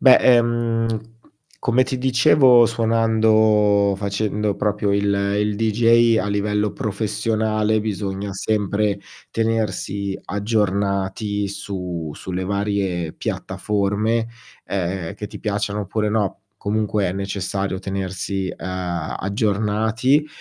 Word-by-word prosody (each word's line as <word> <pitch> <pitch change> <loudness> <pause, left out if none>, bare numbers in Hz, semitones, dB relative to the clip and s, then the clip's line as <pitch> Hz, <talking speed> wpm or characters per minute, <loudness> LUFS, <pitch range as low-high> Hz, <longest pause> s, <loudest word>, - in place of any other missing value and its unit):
Beh, 130 -1 +8
ehm, 115 -2 +2 0.6
come 125 +1 +2
ti 130 0 -2
dicevo 125 -1 +5
suonando 110 -3 +3
facendo 105 +1 -1
proprio 105 0 0
il 100 0 +1 0.4
il 105 0 0
DJ 115 +1 +4
a 95 - -2
livello 105 0 0
professionale, 110 +1 0
bisogna 100 -1 -3
sempre 105 0 0 0.3
tenersi 105 -3 -1
aggiornati 100 -1 -1
su 90 -5 -5
sulle 95 +4 -5
varie 100 -4 -1
piattaforme, 105 +3 -1 0.4
ehm, 90 -2 -3
che 105 - -6
ti - - -10
piacciano 105 0 -2
oppure 105 +2 -1
no, 105 -3 -1 0.2
comunque 105 0 0
è 90 - -1
necessario 95 0 -3
tenersi, 95 0 -3
uhm, - - -10 0.5
aggiornati. 110 +7 +1
105 Hz, 100 wpm, -21 LUFS, 100-110 Hz, 0.6 s, Beh